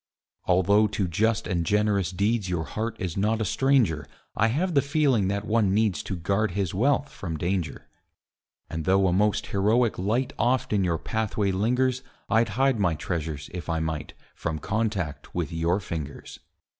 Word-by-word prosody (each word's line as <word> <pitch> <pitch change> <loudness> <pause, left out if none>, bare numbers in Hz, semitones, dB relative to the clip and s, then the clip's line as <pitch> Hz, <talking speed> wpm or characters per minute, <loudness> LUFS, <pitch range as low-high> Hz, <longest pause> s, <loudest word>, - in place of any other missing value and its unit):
Although 100 +4 +4
to 100 -2 -1
just 110 +6 +1
and 85 -3 0
generous 100 0 +1
deeds 100 +2 0
Your 85 -3 -1
heart 110 +7 -3
is 90 -5 -3
not 110 +3 +1
a 110 - 0
stranger, 115 - +2 0.3
I 110 - +3
have 165 +10 0
the 140 - +4
feeling 140 - +2
that 100 +2 -2
one 105 -3 +2
needs 105 -7 +1
To 95 - -4
guard 100 +3 0
his 95 -4 -1
wealth 140 +7 +2
from 85 -4 -5
danger. 90 +1 -2 0.8
And 80 -1 -5
though 95 +1 +4
a 90 - +2
most 105 +2 +2
heroic 110 +4 +1
light 115 +7 0
Oft 120 0 +1
on 100 -2 +2
your 85 -2 +1
pathway 105 0 -1
lingers, 125 +6 +1 0.3
I'd 115 0 +3
hide 135 -3 +3
my 90 -5 +2
treasures, 75 -2 -4
if 90 -1 -6
I 80 -1 0
might, 80 -1 -4 0.2
From 80 -1 -3
contact 100 -4 -3
with 85 -5 -2
your 85 +3 +1
fingers. 80 -7 -7
100 Hz, 170 wpm, -26 LUFS, 85-110 Hz, 0.8 s, Although